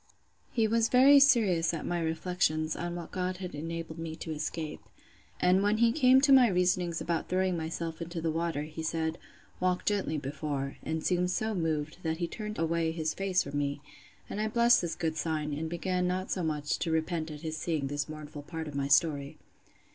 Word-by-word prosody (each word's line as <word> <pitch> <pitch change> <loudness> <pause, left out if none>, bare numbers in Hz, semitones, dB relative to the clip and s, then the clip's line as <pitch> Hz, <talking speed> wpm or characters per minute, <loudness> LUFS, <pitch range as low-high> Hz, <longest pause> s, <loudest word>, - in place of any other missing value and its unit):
He 225 -2 +2
was 230 +1 +2
very 275 +3 +7
serious 200 -12 +4
at 160 - -5
my 175 0 -1
reflections, 160 -1 0
on 175 0 -4
what 170 -1 -7
God 185 0 -2
had 180 -1 -6
enabled 165 +1 -5
me 165 -1 -5
to 160 0 -6
escape. 155 0 -4 0.6
And 180 +2 +4
when 205 +1 +2
he 230 0 +4
came 260 -1 +5
to 275 -1 +5
my 260 -2 +8
reasonings 180 -3 +1
about 165 -1 -2
throwing 185 0 +1
myself 165 0 -4
into 170 0 -4
the 160 0 -1
water, 165 -2 -1
he 155 +1 -7
said, 160 0 -2 0.4
Walk 180 0 0
gently 200 -6 0
before; 140 -1 -4
and 160 0 -3
seemed 180 0 +2
so 220 +4 -1
moved, 160 -4 -2
that 160 -1 -1
he 170 0 -1
turned 210 +3 -6
away 165 0 0
his 160 -1 -2
face 195 -1 +1
from 145 +1 -3
me; 145 0 -1 0.5
and 210 - -4
I 215 - +1
blessed 235 +2 +4
this 170 -2 -3
good 160 -2 -2
sign, 155 -1 -2
and 160 +2 -3
began 180 +1 -1
not 185 +1 -2
so 185 - -1
much 150 -3 -1
to 170 - -2
repent 160 0 -1
at 150 -1 -8
his 160 -1 -4
seeing 155 -4 -1
this 145 +2 -3
mournful 150 -1 -8
part 160 +1 -6
of 150 - -7
my 140 0 -1
story. 145 -1 +2
165 Hz, 200 wpm, -30 LUFS, 155-185 Hz, 0.6 s, my